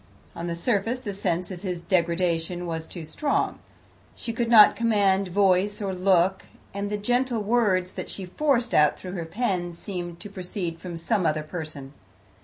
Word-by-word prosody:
On 170 Hz, -, -4 dB
the 170 Hz, -, -2 dB
surface 225 Hz, +6 st, 0 dB
the 210 Hz, -6 st, -5 dB
sense 185 Hz, -1 st, -2 dB
of 180 Hz, -2 st, -7 dB
his 180 Hz, -3 st, -4 dB
degradation 175 Hz, -1 st, 0 dB
was 160 Hz, -1 st, -4 dB
too 170 Hz, -3 st, -8 dB
strong. 285 Hz, -, -1 dB, 0.6 s
She 230 Hz, -, -5 dB
could 230 Hz, 0 st, -1 dB
not 220 Hz, -3 st, +8 dB
command 200 Hz, -4 st, +2 dB
voice 195 Hz, +2 st, +2 dB
or 195 Hz, -2 st, -2 dB
look, 185 Hz, 0 st, +3 dB, 0.3 s
and 200 Hz, +1 st, -3 dB
the 210 Hz, -, -1 dB
gentle 245 Hz, +1 st, 0 dB
words 200 Hz, -5 st, +2 dB
that -, -, -6 dB
she 195 Hz, -, -6 dB
forced 245 Hz, +4 st, 0 dB
out 150 Hz, -1 st, +4 dB
through 185 Hz, -, -8 dB
her 175 Hz, -3 st, -4 dB
pen 180 Hz, -2 st, -2 dB
seemed 175 Hz, -1 st, -6 dB
to 205 Hz, -, -7 dB
proceed 180 Hz, -3 st, -4 dB
from 175 Hz, -1 st, -6 dB
some 185 Hz, +4 st, 0 dB
other 155 Hz, 0 st, 0 dB
person. 155 Hz, -4 st, -7 dB
185 Hz, 175 wpm, -25 LUFS, 170-210 Hz, 0.6 s, not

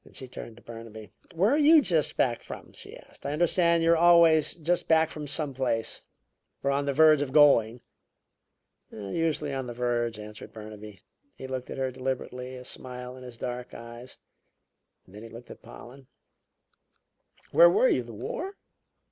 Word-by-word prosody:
She 130 Hz, -, -4 dB
turned 120 Hz, -2 st, -9 dB
to 120 Hz, -, -18 dB
Burnaby. 110 Hz, -3 st, -10 dB, 0.2 s
"Where 195 Hz, +7 st, +3 dB
are 290 Hz, -, +3 dB
you 310 Hz, +2 st, +7 dB
just 170 Hz, -, +1 dB
back 120 Hz, -2 st, +1 dB
from?" -, -, -10 dB
she -, -, -9 dB
asked. -, -, -18 dB
"I 140 Hz, -, -3 dB
understand 170 Hz, +1 st, +2 dB
you 165 Hz, -, +4 dB
are 170 Hz, -, +4 dB
always 170 Hz, -2 st, +5 dB
just 175 Hz, +2 st, -1 dB
back 160 Hz, -1 st, +4 dB
from 150 Hz, -1 st, -7 dB
some 145 Hz, -1 st, -1 dB
place, 125 Hz, -4 st, -2 dB, 0.6 s
or 140 Hz, -, +1 dB
on 140 Hz, +1 st, 0 dB
the 140 Hz, -, 0 dB
verge 155 Hz, 0 st, +5 dB
of 140 Hz, -2 st, -3 dB
going." 125 Hz, -6 st, +4 dB, 1.1 s
"Usually 150 Hz, +7 st, -2 dB
on 135 Hz, -2 st, -4 dB
the 120 Hz, -, -7 dB
verge," 120 Hz, -2 st, -1 dB
answered 105 Hz, 0 st, -10 dB
Burnaby. 105 Hz, -2 st, -11 dB, 0.3 s
He -, -, -9 dB
looked 130 Hz, -1 st, -5 dB
at -, -, -6 dB
her 130 Hz, -1 st, -1 dB
deliberately, 130 Hz, 0 st, -5 dB
a 125 Hz, -, -9 dB
smile 125 Hz, 0 st, -7 dB
in 130 Hz, -, -12 dB
his 125 Hz, -2 st, -10 dB
dark 125 Hz, +1 st, -6 dB
eyes; 120 Hz, +2 st, -10 dB, 0.9 s
then 100 Hz, +3 st, -12 dB
he 115 Hz, -, -10 dB
looked 115 Hz, +2 st, -12 dB
at -, -, -12 dB
Pollen. 130 Hz, +2 st, -13 dB, 1.4 s
"Where -, -, +7 dB
were 475 Hz, +5 st, +3 dB
you -, -, +2 dB
the -, -, -10 dB
War?" 410 Hz, -5 st, -5 dB
130 Hz, 175 wpm, -27 LUFS, 120-160 Hz, 1.4 s, you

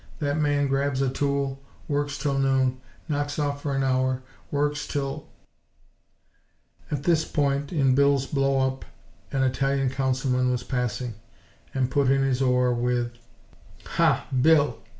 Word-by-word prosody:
That 145 Hz, +1 st, -1 dB
man 145 Hz, -1 st, +2 dB
grabs 135 Hz, 0 st, 0 dB
a 130 Hz, -, 0 dB
tool, 140 Hz, -1 st, -1 dB, 0.3 s
works 145 Hz, -1 st, -1 dB
'til 140 Hz, -1 st, -1 dB
noon; 130 Hz, -1 st, +1 dB, 0.3 s
knocks 145 Hz, -2 st, -2 dB
off 145 Hz, -1 st, -1 dB
for 140 Hz, -2 st, -2 dB
an 135 Hz, -, +1 dB
hour; 130 Hz, 0 st, +1 dB, 0.3 s
works 145 Hz, +1 st, -1 dB
'til 140 Hz, +1 st, -3 dB, 0.7 s
" -, -, -34 dB
At 145 Hz, -2 st, -2 dB
this 160 Hz, -1 st, +3 dB
point 140 Hz, -2 st, -1 dB
in 135 Hz, -6 st, +3 dB
Bill's 140 Hz, 0 st, +3 dB
blow 135 Hz, -1 st, +1 dB
up 130 Hz, 0 st, -3 dB, 0.5 s
an 135 Hz, -1 st, +1 dB
Italian 135 Hz, 0 st, +1 dB
Councilman 130 Hz, -1 st, 0 dB
was 125 Hz, -1 st, -1 dB
passing, 125 Hz, -1 st, -2 dB, 0.6 s
and 130 Hz, -1 st, 0 dB
put 140 Hz, -3 st, +2 dB
in 135 Hz, 0 st, +3 dB
his 135 Hz, -1 st, 0 dB
oar, 125 Hz, -1 st, +3 dB
with: 120 Hz, 0 st, 0 dB, 0.7 s
"Ha, -, -, +2 dB, 0.2 s
Bill! 150 Hz, 0 st, +4 dB
135 Hz, 145 wpm, -25 LUFS, 130-145 Hz, 0.7 s, Bill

